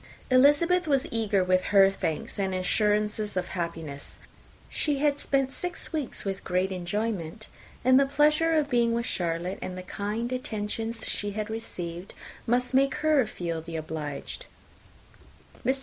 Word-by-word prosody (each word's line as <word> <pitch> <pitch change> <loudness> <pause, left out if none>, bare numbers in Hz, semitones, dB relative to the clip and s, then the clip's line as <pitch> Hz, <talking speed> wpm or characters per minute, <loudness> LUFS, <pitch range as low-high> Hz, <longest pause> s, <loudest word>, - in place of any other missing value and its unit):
Elizabeth 295 +7 +5
was 275 -3 +2
eager 215 -4 +2
with 185 0 +2
her 195 -1 +6
thanks 175 -1 -3
and 190 -1 0
assurances 210 +2 +1
of 180 - -1
happiness. 165 -5 -5 0.5
She 295 -2 0
had 290 0 +2
spent 270 -1 +1
six 355 +3 -4
weeks 300 -9 -2
with 195 -1 -3
great 185 +2 0
enjoyment; 195 +1 -3 0.4
and 255 +1 +7
the 275 - +3
pleasure 300 +3 +3
of 305 -2 +2
being 235 -3 +2
with 235 0 0
Charlotte, 175 -1 -2
and 185 0 -5
the 185 - -6
kind 210 +6 -3
attention 225 -2 -3
she 205 -2 -2
had 215 +1 -3
received, 180 -5 -5 0.3
must 250 +2 +2
make 270 0 +3
her 295 -7 +4
feel 170 -2 -4
the 165 +1 -8
obliged. 155 - -5 1.2
Mr. 265 +2 +2
215 Hz, 150 wpm, -27 LUFS, 185-265 Hz, 1.2 s, and